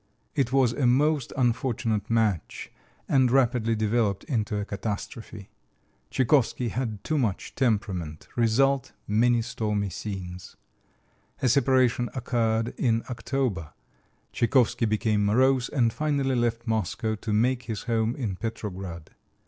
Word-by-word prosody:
It 135 Hz, -4 st, 0 dB
was 130 Hz, -3 st, +3 dB
a 130 Hz, -2 st, +1 dB
most 145 Hz, +1 st, +2 dB
unfortunate 115 Hz, -3 st, 0 dB
match 110 Hz, -6 st, 0 dB, 0.4 s
and 130 Hz, -3 st, +4 dB
rapidly 120 Hz, -3 st, +2 dB
developed 110 Hz, -2 st, 0 dB
into 110 Hz, -5 st, -1 dB
a 105 Hz, -, -2 dB
catastrophe. 105 Hz, 0 st, -6 dB, 0.6 s
Tchaikovsky 125 Hz, -, +2 dB
had 110 Hz, -4 st, -3 dB
too 155 Hz, -1 st, 0 dB
much 110 Hz, -7 st, -2 dB
temperament 100 Hz, -, -1 dB
result, 130 Hz, +3 st, +2 dB
many 115 Hz, +2 st, +3 dB
stormy 105 Hz, -4 st, -2 dB
scenes. 90 Hz, -2 st, -7 dB, 0.9 s
A -, -, +4 dB
separation 130 Hz, -2 st, +3 dB
occurred 115 Hz, -3 st, 0 dB
in 115 Hz, -3 st, +2 dB
October. 115 Hz, -, -2 dB, 0.6 s
Tchaikovsky 120 Hz, 0 st, +2 dB
became 110 Hz, -1 st, +1 dB
morose, 125 Hz, +4 st, +3 dB
and 120 Hz, -5 st, +1 dB
finally 140 Hz, -3 st, 0 dB
left 120 Hz, -1 st, 0 dB
Moscow 110 Hz, 0 st, -1 dB
to 110 Hz, -, -5 dB
make 120 Hz, +4 st, +1 dB
his 110 Hz, -3 st, -4 dB
home 115 Hz, 0 st, 0 dB
in 110 Hz, -9 st, -3 dB
Petrograd. 95 Hz, -7 st, -6 dB
115 Hz, 120 wpm, -26 LUFS, 105-125 Hz, 0.9 s, and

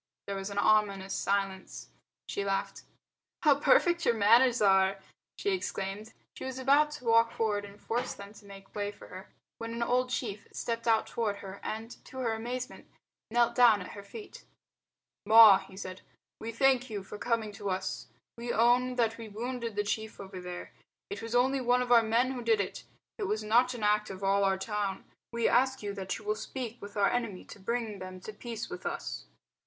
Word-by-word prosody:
There 200 Hz, -, -4 dB
was 195 Hz, +1 st, -4 dB
an 200 Hz, -, -7 dB
ominous 200 Hz, -2 st, +2 dB
silence. 195 Hz, -1 st, -2 dB, 0.4 s
She 200 Hz, -, -2 dB
laughed. 195 Hz, 0 st, -2 dB, 0.6 s
"How 290 Hz, -3 st, +5 dB
perfect 345 Hz, -3 st, +4 dB
your 235 Hz, -, +3 dB
manners 235 Hz, +4 st, +5 dB
are!" 195 Hz, -1 st, +4 dB, 0.4 s
she 405 Hz, -, 0 dB
exclaimed. 210 Hz, -, -4 dB, 0.2 s
She -, -, -8 dB
was 260 Hz, -1 st, -5 dB
about 280 Hz, +3 st, +4 dB
to 250 Hz, -, -9 dB
walk 230 Hz, 0 st, +4 dB
forward 210 Hz, -2 st, -1 dB
and 200 Hz, +1 st, -13 dB
force 240 Hz, +4 st, -2 dB
them 200 Hz, +1 st, -10 dB
to 215 Hz, -, -16 dB
make 195 Hz, -1 st, -13 dB
way 205 Hz, -1 st, -2 dB
for -, -, -14 dB
her 185 Hz, +2 st, -10 dB, 0.3 s
when 230 Hz, 0 st, -5 dB
an 235 Hz, -, -1 dB
old 250 Hz, +1 st, +1 dB
chief 215 Hz, -5 st, -4 dB
stepped 230 Hz, 0 st, -3 dB
out 225 Hz, -1 st, +4 dB
toward 220 Hz, -3 st, -2 dB
her 200 Hz, -1 st, -9 dB
and, 225 Hz, +2 st, -6 dB
to 260 Hz, -, -11 dB
her 240 Hz, -3 st, 0 dB
amazement, 245 Hz, +3 st, -5 dB, 0.4 s
knelt 235 Hz, +1 st, +3 dB
down 235 Hz, -4 st, +6 dB
at 180 Hz, -, -7 dB
her 205 Hz, -, -8 dB
feet. 405 Hz, -, -11 dB, 0.8 s
"Ma," 220 Hz, -3 st, +9 dB
he 190 Hz, -, -13 dB
said, 185 Hz, -1 st, -7 dB, 0.4 s
"we 225 Hz, -, -5 dB
thank 260 Hz, +1 st, +3 dB
you 205 Hz, -3 st, -4 dB
for 205 Hz, +2 st, -9 dB
coming 230 Hz, -3 st, -1 dB
to 200 Hz, -1 st, -5 dB
us. 190 Hz, 0 st, -3 dB, 0.3 s
We 240 Hz, 0 st, -3 dB
own 245 Hz, +2 st, +3 dB
that 230 Hz, -2 st, +1 dB
we 225 Hz, -1 st, -7 dB
wounded 235 Hz, +1 st, -4 dB
the 205 Hz, -, +1 dB
chief 220 Hz, +1 st, -3 dB
over 190 Hz, -2 st, -8 dB
there. 180 Hz, 0 st, -7 dB, 0.4 s
It 200 Hz, +1 st, -5 dB
was 230 Hz, +1 st, -4 dB
only 260 Hz, +2 st, +3 dB
one 250 Hz, 0 st, +3 dB
of 245 Hz, -, -5 dB
our 235 Hz, -1 st, +8 dB
men 230 Hz, +3 st, +2 dB
who 255 Hz, -2 st, -4 dB
did 225 Hz, -2 st, +2 dB
it. 200 Hz, -, -4 dB, 0.3 s
It 405 Hz, -, -1 dB
was 215 Hz, 0 st, -1 dB
not 240 Hz, +4 st, +4 dB
the 235 Hz, -4 st, -3 dB
act 210 Hz, 0 st, +2 dB
of 190 Hz, 0 st, -8 dB
all 200 Hz, +1 st, +3 dB
our 195 Hz, 0 st, +2 dB
town. 200 Hz, -1 st, -3 dB, 0.3 s
We 235 Hz, -1 st, +1 dB
ask 260 Hz, -1 st, +2 dB
you 205 Hz, -1 st, -3 dB
that 195 Hz, -1 st, -4 dB
you 215 Hz, -, -14 dB
will 210 Hz, -, +1 dB
speak 240 Hz, +1 st, -6 dB
with 205 Hz, +1 st, -9 dB
our 200 Hz, -1 st, +3 dB
enemy 230 Hz, -6 st, -2 dB
to -, -, -12 dB
bring 220 Hz, 0 st, -3 dB
them 185 Hz, 0 st, -8 dB
to 215 Hz, -, -8 dB
peace 230 Hz, +1 st, -6 dB
with 360 Hz, 0 st, -8 dB
us." -, -, -5 dB
220 Hz, 200 wpm, -30 LUFS, 200-245 Hz, 0.8 s, Ma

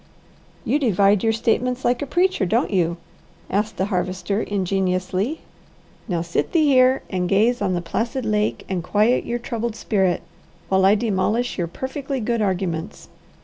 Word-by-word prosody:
"You 295 Hz, -, +2 dB
divide 205 Hz, -6 st, +3 dB
your 225 Hz, -, +3 dB
statements 245 Hz, +3 st, 0 dB
like 245 Hz, 0 st, +2 dB
a 285 Hz, -, -3 dB
preacher, 360 Hz, -, +1 dB
don't 220 Hz, +6 st, +1 dB
you?" 170 Hz, -3 st, +1 dB, 0.5 s
asked 210 Hz, +3 st, -1 dB
the 190 Hz, -, +1 dB
Harvester 185 Hz, +3 st, -1 dB
ingenuously. 190 Hz, -, -1 dB, 0.7 s
"Now 170 Hz, -5 st, -1 dB
sit 170 Hz, 0 st, -2 dB
thee 320 Hz, -3 st, +4 dB
here 260 Hz, -2 st, +4 dB
and 180 Hz, -2 st, -1 dB
gaze 225 Hz, +5 st, +2 dB
on 190 Hz, -3 st, +1 dB
the 175 Hz, -, -1 dB
placid 230 Hz, +8 st, -2 dB
lake 210 Hz, 0 st, 0 dB
and 185 Hz, -3 st, -2 dB
quiet 215 Hz, +7 st, +2 dB
your 240 Hz, -, -1 dB
troubled 235 Hz, -2 st, -4 dB
spirit, 190 Hz, -6 st, 0 dB, 0.5 s
while 190 Hz, 0 st, +3 dB
I 200 Hz, +2 st, +6 dB
demolish 220 Hz, +2 st, 0 dB
your 170 Hz, -, 0 dB
'perfectly 265 Hz, -, -4 dB
good' 235 Hz, 0 st, -1 dB
arguments. 185 Hz, -2 st, -2 dB
210 Hz, 155 wpm, -22 LUFS, 185-240 Hz, 0.7 s, I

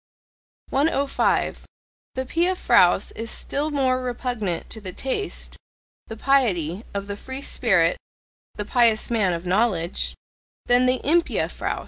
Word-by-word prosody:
105. 280 Hz, -1 st, +1 dB, 0.5 s
The 260 Hz, 0 st, -2 dB
pia 345 Hz, +7 st, +1 dB
fraus 185 Hz, -, +4 dB
is 230 Hz, +1 st, -6 dB
still 290 Hz, +6 st, -1 dB
more 260 Hz, -3 st, +1 dB
repugnant 245 Hz, -7 st, -3 dB
to 220 Hz, -, -6 dB
the 185 Hz, -2 st, -6 dB
taste 270 Hz, -, -3 dB, 0.5 s
(the 225 Hz, -, -7 dB
"piety") 210 Hz, -, +1 dB
of 200 Hz, 0 st, -4 dB
the 200 Hz, 0 st, -5 dB
free 260 Hz, +6 st, -6 dB
spirit 185 Hz, -12 st, +2 dB, 0.6 s
(the 210 Hz, -, -4 dB
"pious 230 Hz, -1 st, +2 dB
man 210 Hz, -6 st, +2 dB
of 170 Hz, +1 st, -4 dB
knowledge") 185 Hz, -2 st, 0 dB, 0.5 s
than 245 Hz, +1 st, +4 dB
the 255 Hz, 0 st, +1 dB
impia 335 Hz, +4 st, +1 dB
fraus. -, -, -3 dB
235 Hz, 130 wpm, -23 LUFS, 195-265 Hz, 0.6 s, fraus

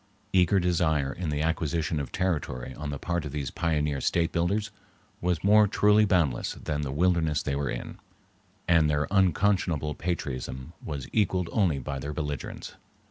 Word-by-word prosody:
Eager 95 Hz, +1 st, +4 dB
desire 80 Hz, -6 st, +1 dB
in 85 Hz, -3 st, -4 dB
the 75 Hz, 0 st, -1 dB
acquisition 80 Hz, -1 st, -1 dB
of 70 Hz, -4 st, -5 dB
territory 75 Hz, -9 st, -2 dB
on 75 Hz, +1 st, -6 dB
the 70 Hz, -, -3 dB
part 85 Hz, +3 st, -2 dB
of 75 Hz, -, -6 dB
these 70 Hz, -3 st, -3 dB
pioneer 75 Hz, -4 st, 0 dB
state 85 Hz, -1 st, +1 dB
builders 100 Hz, +5 st, 0 dB, 0.5 s
was 90 Hz, -2 st, 0 dB
more 105 Hz, +1 st, +6 dB
truly 105 Hz, +1 st, +4 dB
boundless 85 Hz, -11 st, +1 dB
than 75 Hz, -1 st, -3 dB
the 70 Hz, -2 st, -3 dB
wilderness 80 Hz, 0 st, +1 dB
they 70 Hz, -, -1 dB
were 70 Hz, -1 st, -1 dB
in, -, -, -6 dB, 0.7 s
and 80 Hz, -3 st, +4 dB
their 75 Hz, 0 st, +1 dB
unconscionable 90 Hz, -5 st, +2 dB
patriotism 70 Hz, -4 st, -4 dB
was 70 Hz, -4 st, -5 dB
equaled 95 Hz, -5 st, +1 dB
only 90 Hz, -9 st, +2 dB
by 70 Hz, +1 st, -4 dB
their 70 Hz, +3 st, -5 dB
belligerence. 75 Hz, -3 st, -5 dB
80 Hz, 160 wpm, -27 LUFS, 75-90 Hz, 0.7 s, more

